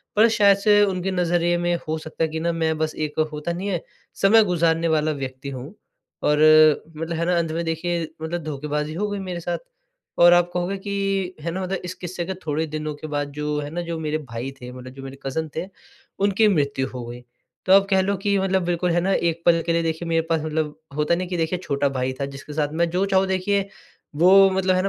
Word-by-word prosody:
पर 215 Hz, +2 st, +6 dB
शायद 205 Hz, -3 st, +5 dB
से 205 Hz, 0 st, +4 dB
उनके 190 Hz, -1 st, -1 dB
नज़रिए 175 Hz, -1 st, +1 dB
में 175 Hz, 0 st, 0 dB
हो 160 Hz, +1 st, -1 dB
सकता 155 Hz, +1 st, -4 dB
है 160 Hz, -, +1 dB
कि 160 Hz, +1 st, -4 dB
न 170 Hz, +1 st, -1 dB
मैं 160 Hz, -1 st, 0 dB
बस 155 Hz, 0 st, -2 dB
एक 155 Hz, 0 st, -3 dB
होता 150 Hz, +3 st, -3 dB
नहीं 185 Hz, +4 st, -4 dB
है 175 Hz, -4 st, -1 dB, 0.4 s
समय 215 Hz, +3 st, +6 dB
गुज़ारने 165 Hz, -3 st, +1 dB
वाला 155 Hz, -1 st, +2 dB
व्यक्ति 135 Hz, -1 st, -5 dB
हूँ। 135 Hz, +5 st, -7 dB, 0.5 s
और 150 Hz, -, +3 dB, 0.6 s
मतलब 165 Hz, +1 st, -3 dB
है 170 Hz, -, 0 dB
न -, -, -1 dB
अंत 165 Hz, -2 st, 0 dB
में 165 Hz, +1 st, -2 dB
देखिए 165 Hz, +1 st, -2 dB
मतलब 170 Hz, +2 st, -3 dB
धोखेबाज़ी 150 Hz, 0 st, -3 dB
हो 205 Hz, +5 st, -2 dB
गई 205 Hz, -1 st, -3 dB
मेरे 185 Hz, -2 st, -5 dB
साथ। 175 Hz, +1 st, -3 dB, 0.6 s
और 175 Hz, 0 st, +9 dB
आप 175 Hz, 0 st, +4 dB
कहोगे 180 Hz, +2 st, -1 dB
कि 195 Hz, -2 st, -2 dB
है 170 Hz, +2 st, -3 dB
न 175 Hz, -, -4 dB
मतलब 190 Hz, 0 st, -2 dB
इस 180 Hz, -, -4 dB
किस्से 175 Hz, -1 st, -5 dB
के 190 Hz, -, -3 dB
थोड़े 155 Hz, +1 st, 0 dB
दिनों 155 Hz, 0 st, -4 dB
के 150 Hz, +2 st, -8 dB
बाद 145 Hz, -1 st, -3 dB
जो 150 Hz, 0 st, -2 dB
है 145 Hz, 0 st, -5 dB
न 175 Hz, -, -1 dB
जो 170 Hz, -1 st, -3 dB
मेरे 155 Hz, -1 st, -1 dB
भाई 125 Hz, -2 st, -6 dB
थे 125 Hz, 0 st, -8 dB
मतलब 130 Hz, 0 st, -10 dB
जो 135 Hz, 0 st, -10 dB
मेरे 135 Hz, 0 st, -8 dB
कज़न 160 Hz, +4 st, -2 dB
थे 165 Hz, -, -2 dB, 0.6 s
उनकी 205 Hz, +2 st, +4 dB
मृत्यु 140 Hz, -8 st, +1 dB
हो 125 Hz, -2 st, -7 dB
गई। 120 Hz, +1 st, -8 dB, 0.4 s
तो 185 Hz, -, +5 dB
आप 195 Hz, 0 st, +6 dB
कह 190 Hz, -2 st, +4 dB
लो 200 Hz, +1 st, 0 dB
कि 200 Hz, +1 st, +1 dB
मतलब 190 Hz, -1 st, +1 dB
बिल्कुल 175 Hz, 0 st, 0 dB
है 175 Hz, +1 st, +2 dB
ना, 195 Hz, +2 st, +1 dB
एक 170 Hz, -2 st, 0 dB
पल 170 Hz, -1 st, +5 dB
के 170 Hz, -, +2 dB
लिए 170 Hz, 0 st, +1 dB
देखिए 165 Hz, +1 st, -2 dB
मेरे 165 Hz, 0 st, +2 dB
पास 165 Hz, -1 st, +1 dB
मतलब 155 Hz, -1 st, -2 dB, 0.2 s
होता 150 Hz, +3 st, +2 dB
नहीं 180 Hz, +1 st, -3 dB
कि 180 Hz, -, -2 dB
देखिए 165 Hz, +2 st, -1 dB
छोटा 140 Hz, -2 st, 0 dB
भाई 130 Hz, -1 st, -2 dB
था। -, -, +1 dB
जिसके 140 Hz, +2 st, -9 dB
साथ 150 Hz, -1 st, -1 dB
मैं 170 Hz, -, +3 dB
जो 185 Hz, +3 st, +1 dB
चाहूँ 195 Hz, -1 st, +2 dB
देखिए 190 Hz, +1 st, 0 dB, 0.5 s
वो 190 Hz, +5 st, +7 dB
मतलब 190 Hz, 0 st, +1 dB
है 185 Hz, -, +1 dB
170 Hz, 235 wpm, -23 LUFS, 150-185 Hz, 0.6 s, और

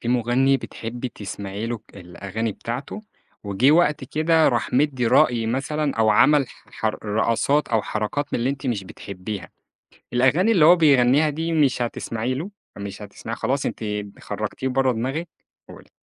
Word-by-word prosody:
في 120 Hz, -, -4 dB
مُغني 125 Hz, +3 st, +3 dB
بتحبي 120 Hz, 0 st, -6 dB
تسمعي 100 Hz, 0 st, -6 dB
له 115 Hz, -1 st, -3 dB
ك 100 Hz, -, -21 dB
الأغاني 100 Hz, +5 st, -4 dB
بتاعته، 125 Hz, -, -6 dB, 0.4 s
وجِه 100 Hz, +8 st, +3 dB
وقت 150 Hz, -4 st, +3 dB
كده 155 Hz, +3 st, +3 dB
راح 120 Hz, -4 st, -1 dB
مِدّي 130 Hz, -3 st, +2 dB
رأي 115 Hz, -1 st, +3 dB
مثلًا 140 Hz, +4 st, -1 dB
أو 110 Hz, -1 st, +4 dB
عمل 140 Hz, +4 st, +4 dB
ح -, -, -18 dB
حر 110 Hz, -1 st, -2 dB
رقصات 115 Hz, +7 st, +1 dB
أو 110 Hz, -2 st, +1 dB
حركات 110 Hz, +9 st, -2 dB
من -, -, 0 dB
اللي 125 Hz, +3 st, 0 dB
أنتِ 140 Hz, 0 st, -5 dB
مش 110 Hz, -6 st, -1 dB
بتحبيها، 95 Hz, 0 st, -7 dB, 0.7 s
الأغاني 145 Hz, -, +3 dB
اللي 170 Hz, -8 st, +5 dB
هو 175 Hz, +2 st, +8 dB
بيغنيها 145 Hz, -1 st, +4 dB
دي 160 Hz, +3 st, -3 dB
مش 140 Hz, -5 st, +2 dB
هتسمعي 120 Hz, +1 st, -2 dB
له؟ 165 Hz, +10 st, -5 dB, 0.3 s
مش 100 Hz, 0 st, -7 dB
هتسمعيها، 110 Hz, +2 st, -7 dB
خلاص 130 Hz, +4 st, -1 dB
أنتِ -, -, -4 dB, 0.4 s
خرّجتيه 130 Hz, -, -4 dB
برّه 130 Hz, 0 st, +2 dB
دماغِك؟ 130 Hz, +9 st, -3 dB, 0.4 s
قولي. -, -, -13 dB
125 Hz, 160 wpm, -23 LUFS, 110-145 Hz, 0.7 s, هو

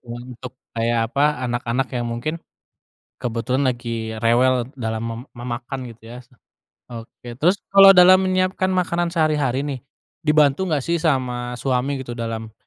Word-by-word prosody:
untuk 120 Hz, +1 st, -9 dB, 0.2 s
kayak 115 Hz, 0 st, 0 dB
apa 140 Hz, +2 st, 0 dB, 0.3 s
anak-anak 120 Hz, +2 st, -1 dB
yang 120 Hz, -2 st, -3 dB
mungkin, 120 Hz, +7 st, -3 dB, 0.8 s
kebetulan 125 Hz, +3 st, -1 dB
lagi 115 Hz, -3 st, -3 dB
rewel 125 Hz, +2 st, +2 dB
dalam 110 Hz, -1 st, -3 dB
me 115 Hz, 0 st, -4 dB, 0.2 s
memakan 120 Hz, +2 st, -5 dB
gitu 115 Hz, +1 st, -13 dB
ya, 125 Hz, -, -10 dB, 0.7 s
oke 115 Hz, +1 st, -11 dB
terus 180 Hz, +6 st, +3 dB, 0.2 s
kalau 195 Hz, -1 st, +8 dB
dalam 185 Hz, +1 st, +8 dB
menyiapkan 185 Hz, 0 st, 0 dB
makanan 175 Hz, -2 st, 0 dB
sehari-hari 150 Hz, -5 st, 0 dB
nih, 140 Hz, -3 st, -4 dB, 0.4 s
dibantu 150 Hz, +2 st, +2 dB
nggak 150 Hz, -5 st, -1 dB
sih 170 Hz, 0 st, 0 dB
sama 125 Hz, -5 st, -1 dB
suami 130 Hz, +2 st, -1 dB
gitu 120 Hz, -, -7 dB
dalam, 115 Hz, -1 st, -5 dB
125 Hz, 135 wpm, -21 LUFS, 120-155 Hz, 0.8 s, kalau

